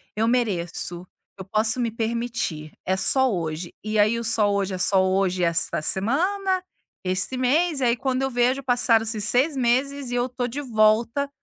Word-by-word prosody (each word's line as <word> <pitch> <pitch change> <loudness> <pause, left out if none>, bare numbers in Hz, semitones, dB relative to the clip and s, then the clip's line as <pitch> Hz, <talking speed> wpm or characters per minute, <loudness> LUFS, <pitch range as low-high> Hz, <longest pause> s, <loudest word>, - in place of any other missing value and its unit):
"Eu 220 +1 0
mereço, 180 -6 -2 0.3
eu 190 - -8
posso 220 +4 0
me 235 -1 0
permitir, 225 -9 -3
é 190 +1 0
só 255 +7 +4
hoje". 165 -1 -4
E 215 0 -2
aí 215 +3 +3
o 235 - -5
só 215 -2 +2
hoje, 200 -1 -1
é - - -3
só 190 +1 +3
hoje 185 -1 0
e 175 - +3
essa 165 -2 +1
semana, 365 - 0 0.4
esse 185 +7 -1
mês, 295 +4 +1
e - - 0
aí 240 -1 +3
quando 260 +1 -1
eu 270 - 0
vejo 250 +2 +1
passaram-se 230 -3 +2
6 255 +8 +2
meses 260 +2 0
e 245 - -2
eu 245 +1 0
tô 245 0 -3
de 265 +5 -5
volta 230 +3 +1
230 Hz, 185 wpm, -23 LUFS, 190-255 Hz, 0.4 s, só